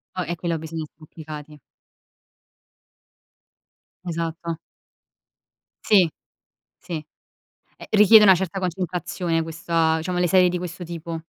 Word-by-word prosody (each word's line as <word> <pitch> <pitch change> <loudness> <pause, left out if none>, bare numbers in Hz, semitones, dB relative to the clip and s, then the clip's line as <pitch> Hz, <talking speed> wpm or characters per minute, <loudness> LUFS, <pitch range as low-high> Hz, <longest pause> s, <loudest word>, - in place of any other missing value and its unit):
Oh, 185 - -1
eh 175 - -2
quello 170 0 -2
bisogna 160 0 -5
essere 155 +1 -15
applicati. 150 -1 -10 2.5
Esatto. 165 -1 -4 1.3
Sì. 190 -5 +5 0.7
Sì. 175 - -9 0.8
Ehm, - - -11
richiede 215 +1 +8
una 190 -2 +8
certa 190 +1 -3
concentrazione 180 -1 -2
questa 160 0 0
diciamo 180 +2 -2
le 180 - +2
serie 180 +1 +5
di 180 - -2
questo 175 0 -6
tipo. 165 -1 -6
170 Hz, 110 wpm, -23 LUFS, 160-180 Hz, 2.5 s, richiede